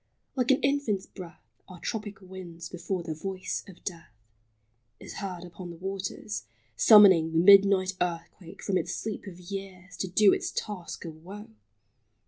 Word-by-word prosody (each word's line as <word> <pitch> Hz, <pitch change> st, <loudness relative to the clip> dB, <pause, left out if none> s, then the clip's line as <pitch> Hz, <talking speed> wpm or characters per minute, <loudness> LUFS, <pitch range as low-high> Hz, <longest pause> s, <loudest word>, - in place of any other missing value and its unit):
Like 250 Hz, -3 st, 0 dB
an 270 Hz, -, +5 dB
infant's 275 Hz, -9 st, +1 dB
breath 180 Hz, -3 st, -12 dB, 0.2 s
Are 180 Hz, -2 st, -11 dB
tropic 210 Hz, -1 st, -5 dB
winds 180 Hz, -3 st, -9 dB
before 180 Hz, +1 st, -4 dB
the 165 Hz, -2 st, -4 dB
voice 185 Hz, +4 st, -4 dB
of 185 Hz, -3 st, -14 dB
death 170 Hz, -3 st, -6 dB, 0.9 s
Is -, -, -9 dB
heard 185 Hz, -3 st, -5 dB
upon 175 Hz, 0 st, -9 dB
the 170 Hz, -, -8 dB
waters, 195 Hz, +3 st, -5 dB, 0.3 s
summoning 190 Hz, -7 st, +7 dB
The -, -, +1 dB
midnight 195 Hz, +1 st, +6 dB
earthquake 170 Hz, 0 st, -4 dB
from 190 Hz, -2 st, +1 dB
its 175 Hz, -, -3 dB
sleep 215 Hz, -1 st, -5 dB
of 180 Hz, -2 st, -9 dB
years 185 Hz, 0 st, -8 dB
To 190 Hz, -, -2 dB
do 195 Hz, +2 st, +5 dB
its -, -, -1 dB
task 190 Hz, -7 st, -5 dB
of 160 Hz, -2 st, -8 dB
woe. 200 Hz, -, -10 dB
185 Hz, 155 wpm, -28 LUFS, 175-200 Hz, 0.9 s, summoning